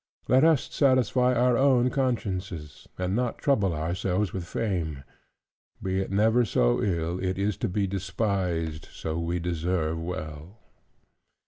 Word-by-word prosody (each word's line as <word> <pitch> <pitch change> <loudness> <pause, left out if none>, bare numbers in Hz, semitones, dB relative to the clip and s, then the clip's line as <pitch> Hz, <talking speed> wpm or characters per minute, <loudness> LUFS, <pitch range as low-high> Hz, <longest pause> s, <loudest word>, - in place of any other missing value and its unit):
"Let 130 +3 +5
us 160 -4 +5
satisfy 125 -2 +3
our 125 +1 +3
own 130 -1 +4
consciences, 95 - -3
and 90 +1 -1
not 125 0 -1
trouble 110 - +2
ourselves 90 +5 -1
with 90 -3 -4
fame: 85 -12 -2 0.8
be 95 0 -1
it 95 - -2
never 110 +5 +3
so - - +2
ill, 85 -1 -1
it 95 -1 -1
is 100 0 0
to - - -2
be 100 +2 0
despised 90 -4 -2
so 80 +1 -4
we 85 +1 -1
deserve 85 -1 -1
well." 80 +2 -6
95 Hz, 135 wpm, -27 LUFS, 85-115 Hz, 0.8 s, Let